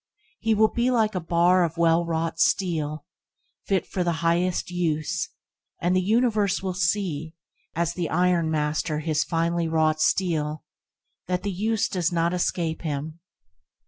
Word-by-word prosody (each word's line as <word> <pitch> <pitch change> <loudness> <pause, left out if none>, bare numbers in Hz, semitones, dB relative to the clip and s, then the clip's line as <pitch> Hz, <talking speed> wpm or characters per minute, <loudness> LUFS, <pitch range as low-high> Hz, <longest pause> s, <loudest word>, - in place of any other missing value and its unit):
He 225 -1 +1
will 215 +1 +4
be 240 +1 +1
like 225 -4 +2
a 185 - -1
bar 175 +2 +3
of 165 -1 -2
well 170 0 +3
wrought 165 0 -2
steel, 155 -6 0 0.6
fit 195 -2 +1
for 185 - -2
the 170 -1 0
highest 175 +2 +1
use, 160 -4 -1 0.5
and 175 +2 +1
the 185 - +3
universe 210 -1 +1
will 190 -1 -2
see, 170 -3 -1 0.4
as 170 +1 0
the 175 -3 -3
ironmaster 160 -3 +1
his 155 -1 0
finely 170 0 0
wrought 155 -1 +1
steel, 155 -3 0 0.6
that 180 0 -1
the 205 - -1
use 220 +4 0
does 180 -4 -1
not 170 0 +1
escape 170 -2 -1
him. 155 +1 -4
170 Hz, 145 wpm, -25 LUFS, 160-185 Hz, 0.6 s, will